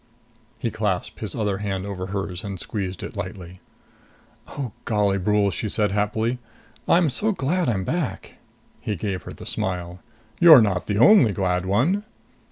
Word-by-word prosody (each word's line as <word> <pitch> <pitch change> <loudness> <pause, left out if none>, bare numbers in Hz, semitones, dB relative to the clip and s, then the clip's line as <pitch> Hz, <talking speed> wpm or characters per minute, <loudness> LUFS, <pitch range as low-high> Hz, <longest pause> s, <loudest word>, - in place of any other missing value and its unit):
He 115 0 -2
clasped 105 -5 -2
his 105 -4 -5
other 105 -4 -1
hand 95 -2 -3
over 95 -2 -5
hers 95 -2 -4
and 100 -2 -5
squeezed 95 -1 -4
it - - -7
lightly. 90 -1 -7 0.9
"Oh, 130 -5 -5
golly, 100 -3 +1
Brule!" 105 +1 +2
she 105 +4 -3
said 105 0 +1
happily. 110 +4 0 0.5
"I'm 170 -1 +4
so 210 - 0
glad 175 0 0
I'm 95 -5 0
back!" 155 - -3 0.4
He 105 - -3
gave 95 -1 -3
her - - -7
the - - -11
smile. 90 -1 -3 0.4
"You're 165 -5 +10
not 95 -4 -1
the 105 - 0
only 125 - +6
glad 90 -1 -1
one!" 145 - +2
105 Hz, 160 wpm, -23 LUFS, 95-120 Hz, 0.9 s, You're